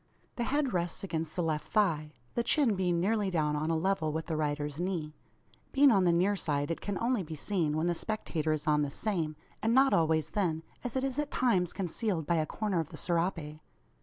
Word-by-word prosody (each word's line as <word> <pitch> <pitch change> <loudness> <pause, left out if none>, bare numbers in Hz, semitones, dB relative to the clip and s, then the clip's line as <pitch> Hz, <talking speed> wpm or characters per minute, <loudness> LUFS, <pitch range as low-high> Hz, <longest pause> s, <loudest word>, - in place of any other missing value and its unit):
The 240 - -1
head 285 -1 0
rests 175 0 -1
against 165 -4 -3
the 175 - 0
left 155 -2 -2
thigh, 155 -8 +2 0.2
the 235 - +1
chin 245 0 +3
being 180 -3 +1
nearly 205 +2 +1
down 155 -4 +1
on 155 +2 -1
a 165 - +2
level 185 -2 0
with 160 +1 -3
the 165 - -2
rider's 150 -1 -2
knee. 175 -4 -2 0.6
Being 280 0 +6
on 195 -4 +4
the 175 - +5
near 185 +4 +3
side 145 -4 -1
it 165 - -3
can 200 -2 -3
only 240 -2 +1
be 160 -2 -6
seen, 155 -2 0
when 160 - 0
the 175 - +2
spectator 165 -5 -2
is 155 -1 -1
on 150 -1 +3
the 145 - 0
same; 165 -2 -1 0.3
and 225 +2 +2
not 270 +1 +5
always 160 -2 +2
then, 165 -5 0 0.2
as 245 -1 -4
it 260 - 0
is 270 +1 -1
at 295 -1 -1
times 190 -9 +2
concealed 185 -2 -2
by 170 +3 +1
a 155 -1 0
corner 205 -2 -1
of 160 -2 -3
the - - -9
serape. 165 -3 -1
170 Hz, 220 wpm, -31 LUFS, 155-205 Hz, 0.6 s, Being